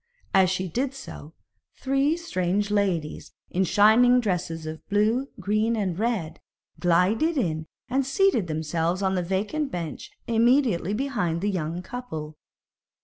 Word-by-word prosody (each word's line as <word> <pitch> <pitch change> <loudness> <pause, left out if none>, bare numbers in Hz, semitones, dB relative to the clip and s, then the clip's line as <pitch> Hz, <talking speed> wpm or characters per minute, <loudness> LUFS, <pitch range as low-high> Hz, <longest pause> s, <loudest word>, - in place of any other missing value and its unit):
As 190 -1 +5
she 185 +1 -1
did 260 - -2
so, 165 - -10 0.4
three 275 +4 +1
strange 205 - -1
ladies 185 -7 -1 0.2
in 185 - +1
shining 225 +6 +5
dresses 175 -7 -2
of 155 0 -7
blue, 215 +6 +2
green, 215 +3 +1
and 190 -5 -2
red, 205 -9 -1 0.4
glided 195 - +2
in 160 - -1 0.2
and 270 +2 +1
seated 270 - +2
themselves 160 +4 -1
on 190 0 +1
a 180 - +1
vacant 210 - -2
bench 170 -3 -5 0.2
immediately 230 -4 +2
behind 205 -11 -1
the 205 +1 0
young 170 -1 -3
couple. 160 -10 -6
200 Hz, 135 wpm, -25 LUFS, 170-245 Hz, 0.4 s, As